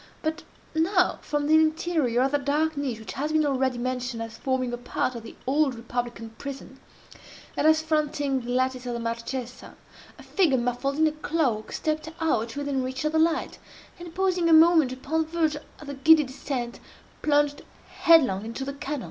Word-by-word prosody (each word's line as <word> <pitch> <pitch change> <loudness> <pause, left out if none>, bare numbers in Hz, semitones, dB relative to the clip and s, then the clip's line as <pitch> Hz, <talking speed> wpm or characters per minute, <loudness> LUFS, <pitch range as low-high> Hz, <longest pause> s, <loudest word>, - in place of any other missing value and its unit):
but 315 +2 -2 0.3
now, 360 +4 +2
from 295 -1 -2
the 305 - +2
interior 315 -5 +2
of 270 - +1
that 290 -1 0
dark 305 +3 +1
niche 275 -5 -2
which 220 - -8
has 295 +3 -2
been 310 -1 +3
already 260 -3 0
mentioned 250 -1 -3
as 225 0 -6
forming 255 0 -1
a - - -2
part 245 +1 -2
of 235 - -7
the 225 - -11
Old 275 0 +2
Republican 235 -1 -5
prison, 270 -1 -8 0.8
and 305 - +2
as 315 0 +4
fronting 295 -4 0
the 240 - -8
lattice 255 0 0
of 240 - -2
the - - -3
Marchesa, 235 +2 -5 0.4
a - - -13
figure 335 -9 +2
muffled 245 +3 -1
in 315 - +4
a 310 - +3
cloak, 300 -8 -1
stepped 310 0 -2
out 235 -8 0
within 285 -2 -1
reach 260 +3 -4
of 305 - +1
the 320 - +2
light, 330 +1 +1 0.4
and, 345 -1 -10
pausing 365 -3 +1
a - - +6
moment 320 -4 +6
upon 275 +5 -1
the 315 - -3
verge 320 -2 0 0.2
of 300 - -12
the 285 - -6
giddy 310 +3 +6
descent, 255 -2 -5 0.4
plunged 290 -1 +2 0.3
headlong 265 - +4
into 230 +4 -5
the 280 - -4
canal. 280 +1 -4
280 Hz, 190 wpm, -26 LUFS, 250-315 Hz, 0.8 s, a